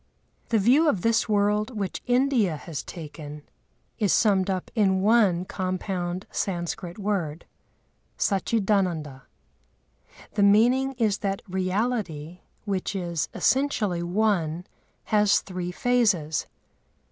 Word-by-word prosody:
The 230 - +3
view 260 +10 +4
of 200 -11 -1
this 225 0 +2
world 210 +2 +1
which 195 -2 -3
India 245 - +2
has 155 -1 -6
taken 150 -3 -9 0.6
is 205 -5 +2
summed 195 -3 +3
up 185 -2 -3
in 190 -4 +2
one 200 -5 +3
compound 185 -1 -3
Sanskrit 175 -1 -3
word, 185 -7 -2 0.7
Sachidānanda. 190 - 0 1.1
The 210 - 0
meaning 240 +7 +4
is 220 -5 0
that 195 -1 -2
Reality, 185 -4 -2 0.3
which 195 -1 -2
is 170 -4 -2
essentially 225 -10 +1
one, 175 -3 0 0.4
has 210 -1 +3
three 180 -2 -5
phases. 190 -9 +1
195 Hz, 105 wpm, -25 LUFS, 175-220 Hz, 1.1 s, view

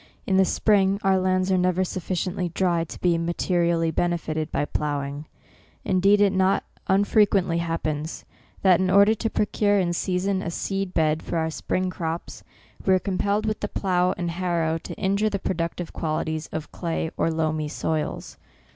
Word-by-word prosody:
In 190 - +2
the 190 - +5
spring, 200 -1 +2
our 190 -1 +3
lands 185 0 +1
are 185 - +3
never 180 +1 +2
sufficiently 185 0 -2
dry 170 -1 0
to - - -10
be 170 -2 +2
materially 170 -1 +1
benefited 160 -2 -1
by - - 0
ploughing; 145 0 -3 0.6
indeed 195 +2 +4
it 200 -1 +4
not 190 +1 +2 0.2
unfrequently 195 -3 +3
happens, 160 -2 -3 0.4
that 185 -3 +5
in 185 0 +1
order 200 +3 +6
to 225 +1 -2
procure 205 -1 +1
in 175 -3 +1
season 185 +2 -1
a - - -3 0.2
&eed 195 -1 -2
bed 155 -1 +2
for - - -3
our 160 0 0
spring 185 +3 -2
crops, 165 -1 -5 0.4
we 190 - +4
are - - +2
compelled 200 +2 -1
with 215 -1 -1
the 205 - -2
plough 180 -3 0
and 175 -1 -2
harrow 170 -2 -1
to - - -8
injure 200 +2 +1
the 200 - -2
productive 170 -2 -3
qualities 155 0 -2
of 155 -1 -6
clay 165 -2 -3
or - - +1
loamy 155 -1 -1
soils. 155 0 -3
180 Hz, 165 wpm, -24 LUFS, 165-190 Hz, 0.6 s, order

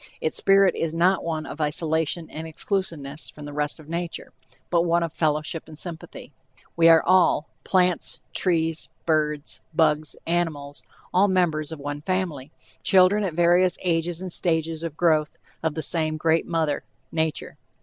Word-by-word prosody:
Its 160 - -1
spirit 195 -1 +4
is 165 -1 -2
not 180 +3 +3
one 160 -2 -3
of 160 - -7
isolation 160 +2 0
and 160 +1 -6
exclusiveness 160 -4 -3
from 150 - -11
the 145 - -8
rest 150 +1 -1
of 155 - -14
nature, 170 +1 -5 0.4
but 170 -1 +4
one 170 0 +2
of 165 -2 -4
fellowship 155 0 -1
and 155 - -11
sympathy. 165 0 -8 0.4
We 165 0 +6
are 165 -1 +6
all 180 -4 +3
plants, 180 -2 +2
trees, 165 -3 +1 0.2
birds, 150 -2 0
bugs, 155 -2 +2
animals 160 -4 -2 0.3
all 190 +3 +5
members 165 -5 +1
of 160 - -6
one 145 +1 -5
family, 165 -6 -2 0.3
children 190 +2 +5
at 180 -5 -2
various 175 +2 +4
ages 170 0 -1
and 185 - -5
stages 160 -2 0
of 165 -2 -5
growth 155 -3 +2 0.2
of 160 -2 -1
the 160 - -3
same 155 -2 0
great 160 +1 +1
mother, 160 -3 -1 0.3
Nature. 160 -1 -2
165 Hz, 160 wpm, -24 LUFS, 155-175 Hz, 0.4 s, We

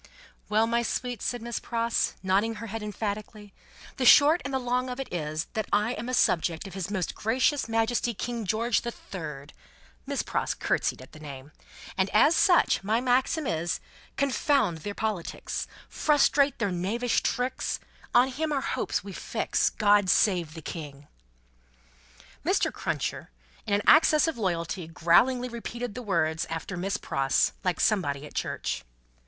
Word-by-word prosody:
"Well, 215 +1 +3
my 235 +1 +1
sweet," 245 -1 -3
said 245 -2 -2
Miss 235 0 -3
Pross, 230 -1 -1
nodding 200 +4 +1
her 225 +2 -7
head 225 +1 -5
emphatically, 210 0 -5 0.4
"the 265 - -1
short 295 +6 +7
and 275 - -4
the 265 - +1
long 250 0 -1
of 250 +1 -5
it 270 - -6
is, 155 -1 -2
that 220 -2 -2
I 210 +3 +2
am 240 +1 -5
a 255 - 0
subject 165 -6 +1
of 195 - -8
His 190 -1 -4
Most 190 -5 -2
Gracious 255 +4 +1
Majesty 225 +1 0
King 235 -1 -4
George 225 +3 +1
the 235 - -3
Third;" 150 -10 -8 0.5
Miss - - -1
Pross - - -1
curtseyed - - -1
at 130 - -16
the 155 - -13
name; 140 -1 -9 0.5
"and 190 +1 +2
as 295 +10 +6
such, 355 - +4
my 215 +3 +1
maxim 260 +5 +1
is, 170 -4 -1 0.4
Confound 275 - +1
their 200 +6 -6
politics, 215 -6 -3 0.2
Frustrate 285 -2 +3
their 205 -4 -1
knavish 210 +8 0
tricks, 250 +1 -1 0.4
On 245 +2 +6
him 305 +4 -2
our 280 -2 0
hopes - - -2
we - - -8
fix, - - 0
God 205 -2 +3
save 175 -7 +2
the 160 - -9
King!" 145 -3 -8 1.4
Mr. - - +1
Cruncher, - - -3 0.4
in 200 - +2
an 205 - 0
access 310 0 +6
of 325 - -1
loyalty, 170 -3 -2
growlingly 240 +10 +3
repeated 235 -1 -5
the 250 - -6
words 165 -7 0
after 165 +3 -4
Miss 190 +3 -2
Pross, 135 0 +1
like 180 -3 0
somebody 150 -9 +1
at - - -12
church. - - -3
215 Hz, 160 wpm, -27 LUFS, 175-245 Hz, 1.4 s, short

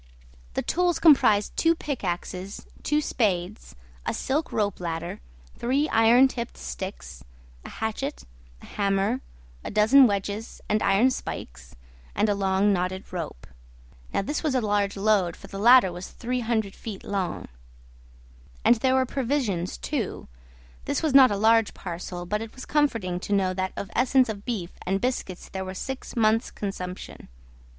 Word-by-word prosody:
The - - 0
tools 355 0 +1
comprised 215 -10 +5
two 330 0 +3
pickaxes, 190 - -4 0.2
two 300 +1 +1
spades, 205 -7 -1 0.3
a - - -2
silk 295 +4 -1
ropeladder, 175 -5 -2 0.4
three 270 +5 +1
iron 230 +4 +6
tipped 235 -2 -6
sticks, 60 -1 -7 0.4
a - - -9
hatchet, 220 +6 -4 0.4
a - - -10
hammer, 200 +4 0 0.4
a - - -5
dozen 225 +6 +6
wedges 205 +1 -3
and 215 0 +1
iron 205 +7 +4
spikes, 60 - -7 0.4
and 215 - +2
a - - +3
long 195 +1 +2
knotted 185 +1 -3
rope. 165 - -5 0.7
Now - - 0
this 295 +9 -2
was 305 -4 0
a - - +4
large 205 -2 0
load, 195 -4 +2
for - - -13
the 195 - -8
ladder 240 -3 +7
was 175 +1 -7
300 230 -4 -2
feet 215 -4 -8
long. 195 -3 -3 1.2
And 240 - +6
there 260 +3 +2
were 260 0 +3
provisions 245 -9 -1
too: 260 -10 -3 0.6
this - - -1
was 310 -4 +1
not 265 -2 +9
a 205 - -1
large 225 +1 +3
parcel, 175 0 -6
but 210 +4 -2
it 225 -1 -8
was 260 - -8
comforting 230 -12 0
to 205 - -3
know 190 -2 +2
that 185 0 -2
of 200 - -5
essence 255 0 +3
of 205 -2 -6
beef 205 -8 -3
and 195 +2 0
biscuits 195 -6 -3
there 190 0 -4
were 185 0 -6
six 265 +6 -6
months' 225 +1 +2
consumption. 185 -2 -6
210 Hz, 155 wpm, -26 LUFS, 190-250 Hz, 1.2 s, not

